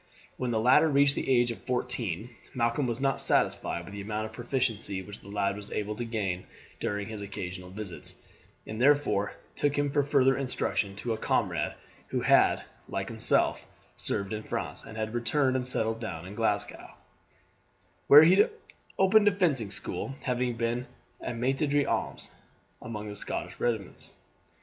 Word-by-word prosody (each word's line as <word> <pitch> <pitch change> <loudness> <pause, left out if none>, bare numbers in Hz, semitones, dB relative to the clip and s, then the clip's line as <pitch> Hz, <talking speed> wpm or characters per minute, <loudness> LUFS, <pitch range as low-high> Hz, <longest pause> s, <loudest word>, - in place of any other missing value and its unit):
When 125 - -2
the 115 -2 +1
latter 130 +7 +5
reached 140 -1 +5
the - - -3
age 120 -2 +4
of 115 - -8
fourteen 120 -4 -2 0.2
Malcolm 120 +2 +1
was 120 0 -2
not 135 0 +1
satisfied 85 - +2
with 100 - -10
the 100 - -5
amount 105 +2 -3
of 110 - -8
proficiency 115 -5 -1
which 105 +2 -10
the - - -16
lad 100 -1 0
was 105 0 -4
able 105 0 -2
to 120 - -2
gain 100 -6 -3 0.3
during 105 -1 -2
his 110 -2 -6
occasional 90 -2 -6
visits, 95 -2 -7 0.5
and 110 +2 -5
therefore 140 -8 +3 0.2
took 145 0 0
him 145 -1 +1
for 145 - +3
further 135 -2 +3
instruction 125 -6 -1
to 115 +3 -2
a 110 - -5
comrade - - 0 0.3
who - - -1
had, - - +4 0.3
like - - -3
himself, - - +2 0.3
served 100 +1 -1
in 110 - -3
France, - - -4
and 110 - -9
had 110 0 -3
returned 130 +3 +1
and 125 -1 0
settled 115 -2 0
down 90 -8 -5
in 95 - -8
Glasgow, 105 -2 -2 1.1
where 145 +2 +10
he 185 +5 +6 0.5
opened 205 +2 +5
a - - +7
fencing 155 - +1
school, 135 +6 -4
having 125 -2 -1
been 120 +2 -1 0.3
a - - -3
maitre 135 +5 0
d'armes 145 0 0 0.5
among 105 -2 -6
the 105 - -6
Scotch - - -4
regiments. 110 -6 -3
115 Hz, 165 wpm, -29 LUFS, 105-135 Hz, 1.1 s, where